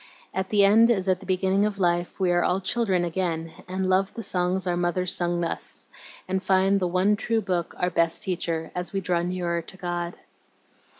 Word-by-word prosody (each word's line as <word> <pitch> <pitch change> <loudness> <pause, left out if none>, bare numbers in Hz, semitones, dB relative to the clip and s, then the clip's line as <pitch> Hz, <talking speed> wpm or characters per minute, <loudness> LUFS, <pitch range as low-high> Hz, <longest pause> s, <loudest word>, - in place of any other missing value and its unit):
At 190 0 -2
the 205 -2 +5
end 225 +4 +6
as 195 -5 +1
at 185 -1 +2
the - - -13
beginning 190 +1 +2
of 210 -1 -1
life 175 -1 0
we 185 -2 +2
are 175 0 +3
all 180 - +1
children 195 -2 +1
again, 165 -2 -2 0.2
and 185 +1 -2
love 190 +1 +2
the 230 - -5
songs 180 0 0
our 175 -1 0
mothers 175 +1 0
sung 175 -1 0
us, 165 - -2 0.4
and 190 0 -1
find 195 +1 +3
the 180 - 0
one 185 +4 +2
true 225 +2 0
Book 180 -5 -2
our 180 0 0
best 165 -1 +1
teacher 165 -3 -2
as 180 0 -4
we 195 - -1
draw 175 -2 0
near 175 -1 -2
to 190 - -12
God." 175 -1 -4
185 Hz, 200 wpm, -25 LUFS, 175-190 Hz, 0.4 s, end